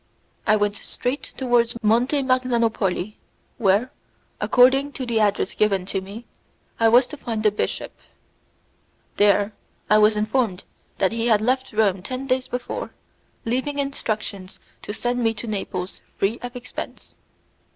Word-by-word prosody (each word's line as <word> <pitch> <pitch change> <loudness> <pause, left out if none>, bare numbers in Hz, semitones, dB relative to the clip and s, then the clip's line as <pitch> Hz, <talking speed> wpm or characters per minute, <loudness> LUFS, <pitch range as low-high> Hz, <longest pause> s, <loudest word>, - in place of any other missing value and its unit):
I 215 - +6
went 205 -1 0
straight 255 +7 -4
towards 240 -2 +2
Monte 245 +6 +3
Magnanopoli, 230 -6 0 0.4
where, 210 +4 +3 0.5
according 270 +3 +4
to 260 - -4
the 235 -2 0
address 205 -1 +1
given 195 -3 +1
to 195 0 -2
me, 205 +5 -9 0.5
I 230 - +5
was 245 +3 +6
to 300 +4 -9
find 225 -5 -3
the 210 - +5
bishop. 210 - -2 1.3
There 205 0 +4 0.4
I 215 - +7
was 215 0 +5
informed 215 -2 0 0.3
that 190 - +2
he 230 +1 -1
had 220 -3 +5
left 255 +4 0
Rome 205 -4 +2
ten 255 +7 -5
days 255 -1 0
before, 250 0 -4 0.6
leaving 260 +5 -1
instructions 215 -8 -3 0.2
to - - -6
send 245 +3 -1
me 225 -1 +1
to 220 - -6
Naples 190 -4 -4 0.2
free 210 +5 0
of 245 +1 -7
expense. 250 0 -8
225 Hz, 140 wpm, -23 LUFS, 205-250 Hz, 1.3 s, I